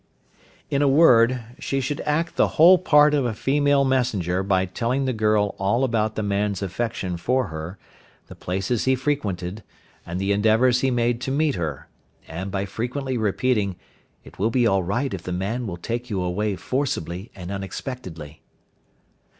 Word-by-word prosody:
In 140 - +1
a 145 - +4
word, 130 -4 +5 0.2
she 135 -2 -2
should 135 +2 -3
act 160 +3 0
the - - +3
whole 175 +4 +8
part 150 -4 +5
of 145 -2 +2
a 120 -3 -2
female 145 +2 +2
messenger 110 -9 0
by 95 -1 +1
telling 120 +8 -1
the 130 - 0
girl 105 -2 +1
all 100 +7 +1
about 110 -4 0
the 110 - -2
man's 100 -1 -1
affection 95 -2 -3
for 125 +4 0
her, 80 +4 -7 0.5
the - - -11
places 95 +5 -2
he 130 0 +3
frequented, 105 -9 -2 0.4
and 85 +2 -5
the 95 +1 0
endeavours 110 +5 +3
he 135 - +2
made 120 -1 0
to 125 - -3
meet 150 +1 +1
her, 80 -6 -4 0.4
and 90 +5 -5
by 100 0 -2
frequently 125 +6 -3
repeating, 110 -2 0 0.5
"It - - -16
will 105 +4 +2
be 120 +1 +2
all 95 -4 +3
right 120 +9 -2
if 95 - -4
the 90 - -6
man 105 +7 -2
will 85 -3 -5
take 120 +7 -4
you 100 -4 -2
away 100 +3 -1
forcibly 95 - -3
and 90 -1 -7
unexpectedly." 95 - -7
110 Hz, 170 wpm, -23 LUFS, 95-130 Hz, 0.5 s, whole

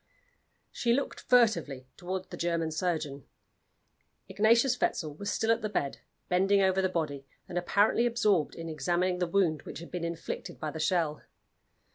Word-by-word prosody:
She 235 -1 +1
looked 275 +3 -1
furtively 215 - +2
toward 185 +1 -5
the - - -5
German 170 -2 -1
surgeon. 155 -5 -2 1.0
Ignatius 235 +4 +3
Wetzel 155 -3 0
was 200 +7 -5
still 225 - +1
at 230 - +2
the 215 - -2
bed, 140 -8 -2 0.3
bending 195 +3 +3
over 190 0 +3
the 185 - +1
body, 145 -6 -3 0.2
and 180 - -8
apparently 205 +6 +3
absorbed 210 -9 +1
in 165 0 -6
examining 175 +4 0
the 180 - +1
wound 170 -4 +1
which - - -8
had 170 - -10
been 180 -1 -4
inflicted 170 -1 -5
by 155 - -3
the 160 - -7
shell. 160 -2 0
180 Hz, 160 wpm, -30 LUFS, 160-205 Hz, 1.0 s, Ignatius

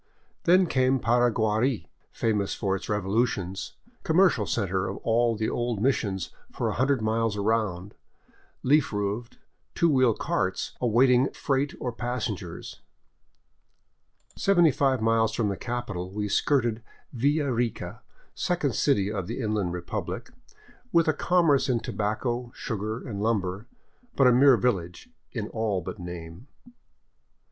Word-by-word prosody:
Then 185 +2 +5
came 130 -4 +2
Paraguari, 120 0 +1 0.2
famous 105 -3 -1
for 95 -1 -1
its 95 - -7
revolutions, 100 -2 -1 0.3
commercial 160 - +3
center 95 -4 -1
of 100 - -4
all 115 0 +2
the 110 0 -1
old 120 -3 -1
missions 100 -7 0 0.2
for - - -2
a - - -2
hundred 130 -2 +1
miles 110 -1 0
around, 100 -3 -1 0.7
leaf 145 +2 +3
roofed, 105 +3 -3 0.4
two 170 -1 +3
wheel 130 -5 +4
carts 95 0 -1
awaiting 125 +2 +4
freight 140 0 -1
or 125 - -2
passengers. 115 -8 -5 1.5
Seventy 175 -5 +4
five 130 -3 +1
miles 115 0 +2
from 110 -3 0
the 100 - -2
capital 105 -6 -4
we 105 +2 -3
skirted 120 0 +1 0.3
Villa 140 +3 +1
Rica, 120 -1 -3 0.3
second 170 -8 -1
city 105 -8 +2
of 100 -5 -3
the - - -4
Inland 105 -6 -1
Republic, 90 0 -5 0.6
with 170 -4 +3
a 155 - +4
commerce 165 -7 +2
in 120 -2 +2
tobacco, 120 +4 -2
sugar, 110 +3 -4
and 100 -4 -4
lumber, 105 -2 -1 0.5
but 135 - +4
a 125 - +7
mere 130 0 +6
village 90 -7 -2 0.2
in - - -4
all 110 -4 -1
but 90 - -7
name. 85 - -8
115 Hz, 130 wpm, -26 LUFS, 100-130 Hz, 1.5 s, a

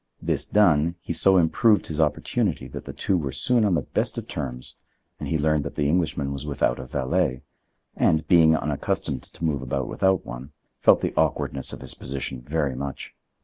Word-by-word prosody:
This - - -1
done, 85 -5 +3
he 85 - -4
so 95 +3 +4
improved 100 +5 +3
his 80 0 -2
opportunity 75 -1 0
that - - -8
the - - -6
two 95 - -1
were 70 -4 -3
soon 120 - +2
on 100 -4 +3
the 75 - 0
best - - -1
of - - -5
terms, 60 -1 -5 0.4
and - - -5
he 80 - +1
learned 75 -1 +1
that 70 - -6
the 75 -2 +1
Englishman 75 -4 0
was 70 0 -5
without 70 -4 0
a 65 - -7
valet, 65 0 -1 0.5
and, 80 0 +2
being 80 -2 +6
unaccustomed 70 -3 -2
to 85 - -7
move 75 -4 0
about 65 0 -2
without 95 -1 +1
one, 65 +4 -8 0.3
felt - - +5
the - - -1
awkwardness 70 -1 0
of - - -8
his - - -5
position 65 -1 -5
very 70 +1 -1
much. 70 +1 -6
75 Hz, 190 wpm, -24 LUFS, 70-85 Hz, 0.5 s, being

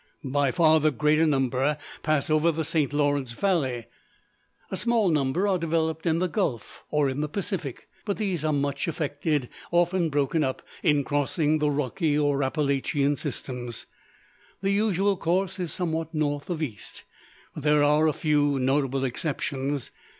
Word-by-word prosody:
By 140 0 +1
far 160 0 +4
the 155 +1 +3
greater 155 +3 +2
number 135 +1 +1 0.2
pass 155 -2 +1
over 155 +2 +4
the 160 0 -3
St. 155 -3 0
Lawrence 145 -4 0
valley. 135 - 0 0.9
A - - -1
small 230 -1 +2
number 155 +5 +1
are 190 -2 +2
developed 160 0 -1
in 160 0 +3
the 185 +2 +1
Gulf, 160 - -3
or 150 -2 +2
in 135 +2 -2
the 150 - -2
Pacific: 170 - -4 0.2
but 200 -2 -2
these 190 -7 -1
are 155 - +1
much 140 0 -1
affected, 145 -3 -1 0.2
often 175 0 +2
broken 145 +2 +1
up, 130 -1 -2 0.2
in 150 -4 +3
crossing 150 +2 +1
the 150 0 +2
Rocky 145 +2 0
or 145 -1 +2
Appalachian 140 0 +1
systems. 125 -4 -5 0.8
The 195 - +2
usual 200 -1 +2
course 185 +3 0
is 175 -4 -3
somewhat 165 -2 -3
north 145 0 -1
of 165 -3 -2
east; 110 -9 -7 0.5
but - - -7
there 150 0 +4
are 150 +2 +4
a - - +3
few 145 -2 +2
notable 135 0 +1
exceptions. 135 0 -2
150 Hz, 155 wpm, -26 LUFS, 140-165 Hz, 0.9 s, far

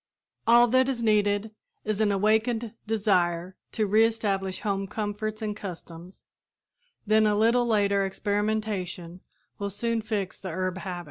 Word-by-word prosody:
All 240 +1 +7
that 260 +2 +3
is 240 -3 -2
needed 210 -1 +2 0.3
is 215 0 -1
an 210 -1 +3
awakened 220 +3 +1
desire 185 -5 +1 0.2
to 220 - +1
re 215 +2 +4
establish 200 -4 -1
home 195 -1 -1
comforts 215 +1 -4
and 210 -1 -2
customs, 175 -2 -9 0.8
then 215 0 +4
a 210 - +2
little 235 +3 +3
later 200 -3 +2
experimentation 200 -3 -2 0.4
will 200 0 -2
soon 230 +3 -1
fix 210 -3 -3
the 190 - -6
herb 185 +2 -2
habit. 185 -3 -5
205 Hz, 140 wpm, -27 LUFS, 195-220 Hz, 0.8 s, All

